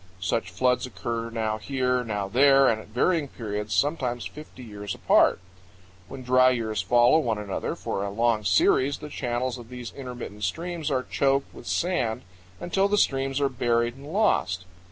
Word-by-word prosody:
Such 95 +2 -1
floods 125 +8 +1
occur 115 +2 -4
now 110 -1 -2
here, 125 0 0
now 105 -4 -3
there, 135 +5 +5
and 110 -2 +1
at - - -15
varying 145 +7 +1
periods, 105 -4 -4
sometimes 125 - 0
fifty 150 -4 -10
years 105 -3 -6
apart. - - +4 0.7
When 135 -1 -9
dry 130 +1 +5
years 115 -4 -1
follow 120 +5 +4
one 115 -8 -1
another 105 -2 -3
for 100 - -3
a 100 - -2
long 115 +1 +1
series, 130 +9 +3
the 150 - -9
channels 125 -1 -2
of 115 -1 -12
these 125 -2 -8
intermittent 125 -6 -8
streams 165 - -3
are 130 -3 0
choked 135 +1 0
with - - -12
sand 165 -11 -1 0.4
until 195 +3 +1
the 205 +1 +1
streams 135 -5 +1
are 140 - +2
buried 120 -2 0
and 140 +3 -11
lost. 130 - +1
125 Hz, 170 wpm, -26 LUFS, 110-135 Hz, 0.7 s, there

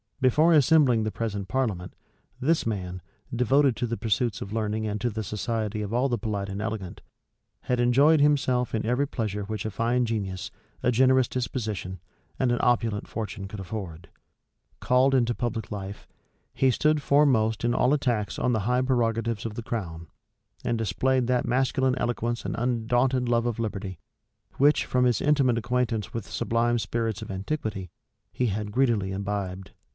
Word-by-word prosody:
Before 150 +6 +4
assembling 140 -6 +5
the 110 - -1
present 105 -4 -3
parliament, 100 -8 -2 0.4
this 155 +5 +1
man, 90 -5 -3 0.3
devoted 130 +2 +3
to 120 - -2
the 115 0 -3
pursuits 110 -2 0
of 100 - -6
learning 110 0 -1
and 105 0 -2
to 120 - +1
the 110 0 -4
society 110 +1 -2
of 105 +1 -4
all 125 +3 +2
the 120 - 0
polite 105 -3 -3
and 100 +1 -4
elegant, 105 -4 -5 0.6
had 125 -1 -1
enjoyed 140 +6 +5
himself 135 -4 +2
in 110 - -1
every 125 +5 +1
pleasure 105 -5 -3
which 105 0 -4
a 110 - -2
fine 120 +4 +1
genius, 100 -5 -3 0.3
a 125 - +3
generous 130 +1 +4
disposition, 110 -7 -4 0.4
and 130 -2 +2
an 120 - +1
opulent 115 -4 +1
fortune 100 -3 -5
could 100 +1 -8
afford. 90 -4 -7 0.7
Called 130 +2 +3
into 120 -2 +2
public 115 -2 -3
life, 100 0 -6 0.5
he 135 - +3
stood 150 +4 +2
foremost 130 -7 +3
in 120 0 +2
all 125 +3 +3
attacks 120 -8 0
on 125 - +1
the 110 - +1
high 125 +5 +1
prerogatives 115 -3 0
of 110 -2 -4
the 120 - -5
crown; 85 -8 -5 0.6
and 120 - 0
displayed 125 +5 +1
that 125 -1 +1
masculine 130 0 +1
eloquence 120 0 -2
and - - -2
undaunted 125 +2 +1
love 120 0 +2
of 115 -1 -2
liberty, 100 -5 -4 0.6
which, 145 +2 +4
from 125 0 +2
his 120 -4 +2
intimate 140 -5 +3
acquaintance 120 -3 -1
with 115 -3 -4
the - - -15
sublime 120 +1 +1
spirits 115 -2 -2
of - - -7
antiquity, 95 - -4 0.4
he 125 - 0
had 105 0 -3
greedily 115 -6 +1
imbibed. 95 -1 -4
115 Hz, 170 wpm, -26 LUFS, 105-125 Hz, 0.7 s, assembling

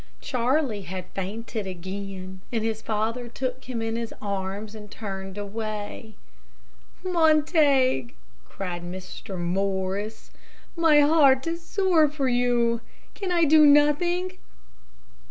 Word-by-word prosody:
Charlie 250 -3 0
had 185 0 -6
fainted 210 +2 -4
again, 190 +1 -6
and 225 -2 -1
his 220 -1 -2
father 225 +3 -2
took 255 +2 -4
him 240 -3 -3
in 225 0 -2
his 230 -1 -3
arms, 200 +1 -4
and 210 -1 -10
turned 195 -2 -6
away. 215 +1 -5 0.9
"Montague!" 305 - +3 0.4
cried 180 -3 -5
Mr. 185 +2 -7
Morris, 190 +4 -2 0.4
"my 320 -3 +5
heart 285 -3 +5
is 335 +1 -3
sore 355 -4 +3
for 280 -2 -1
you. 240 -1 +2 0.3
Can 385 -3 -4
I 345 -1 +3
do 310 0 +7
nothing?" 345 +6 +4
230 Hz, 115 wpm, -25 LUFS, 195-295 Hz, 0.9 s, do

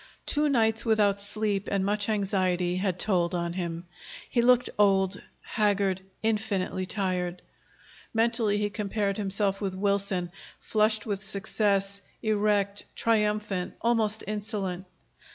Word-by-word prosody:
Two 300 0 +2
nights 225 -4 +2
without 210 -3 +3
sleep 205 -1 -1
and 195 -1 +1
much 205 +1 0
anxiety 185 -4 +1
had 185 -2 0
told 180 -3 +1
on 170 -1 -1
him. 170 -1 -4 0.5
He 240 - +3
looked 250 +1 +5
old, 195 -1 +3 0.2
haggard; 200 -4 +1 0.2
infinitely 205 -4 -1
tired. 180 -3 -2 0.7
Mentally 225 -2 +2
he 205 0 0
compared 200 -1 -1
himself 200 -1 -1
with 195 -2 -2
Wilson, 195 -2 0 0.3
flushed 215 0 +1
with 200 -3 -3
success, 200 0 -1 0.2
erect, 205 -2 +1
triumphant, 210 -4 0
almost 220 -2 +1
insolent. 200 -3 -3
200 Hz, 115 wpm, -28 LUFS, 190-215 Hz, 0.7 s, looked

